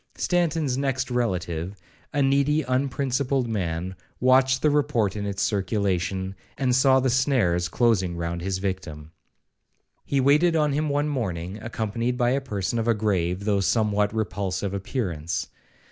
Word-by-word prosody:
Stanton's 160 -7 0
next 130 -2 -1
relative, 90 -6 -2 0.4
a 145 - +1
needy 140 +3 +2
unprincipled 130 0 0
man, 90 -4 -3 0.2
watched 130 +1 +4
the 150 - +4
report 140 -9 +1
in 100 -1 -3
its 100 -1 -2
circulation, 95 -2 -1 0.2
and 130 -2 +1
saw 130 0 +5
the 130 -1 +1
snares 115 -10 +2
closing 95 -6 +1
round 85 0 -3
his 95 +1 -2
victim. 85 -6 -5 0.9
He 140 - 0
waited 150 +6 +4
on 150 -2 +2
him 150 +1 0
one 145 +1 +1
morning, 95 - -3
accompanied 115 +2 -2
by 120 -1 +2
a 135 +2 +1
person 110 -2 -2
of 115 - -2
a 115 - +3
grave, 95 -3 -1
though 105 -2 +2
somewhat 105 +1 +1
repulsive 100 -3 -2
appearance. 90 - -3
110 Hz, 145 wpm, -25 LUFS, 95-135 Hz, 0.9 s, saw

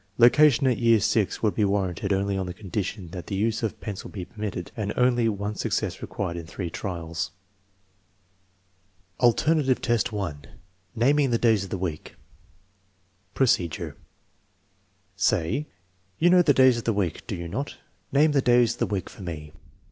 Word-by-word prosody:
Location 140 +3 +6
at 125 -3 +2
year 115 -1 +5
VI 105 -1 +2 0.2
would 105 - +2
be 110 - +1
warranted 100 -1 0
only 100 0 +1
on 95 -1 -2
the 90 - -6
condition 95 -1 -4
that 90 0 -8
the 100 - -3
use 110 +3 0
of 110 -3 -3
pencil 100 -3 -6
be 95 -4 -6
permitted 105 -5 -6
and 105 -2 -2
only 120 -2 +3
one 105 0 -3
success - - -2
required 85 -4 -4
in 85 -1 -7
three 85 0 -5
trials. 85 -4 -4 1.9
VIIj - - -8
Alternative 135 +2 +3
test 120 -2 0
1: 85 -9 -4 0.5
naming 135 +4 +3
the 120 - +2
days 110 -4 +3
of 95 - -8
the 95 - -3
week 85 -4 -5 1.2
Procedure. 90 - +1 1.2
Say: 105 - 0 0.5
"You 175 +2 +4
'know 180 0 +7
the 165 - +4
days 130 -2 +5
of - - -9
the 115 - +2
week, 95 -6 -1
do - - -3
you 85 -1 -6
not? 135 +12 -4 0.3
Name 150 +2 +4
the 140 -2 +3
days 120 -2 +4
of - - -15
the - - +1
week 100 -3 -3
for - - -12
me." 80 -4 -6
105 Hz, 170 wpm, -25 LUFS, 95-120 Hz, 1.9 s, know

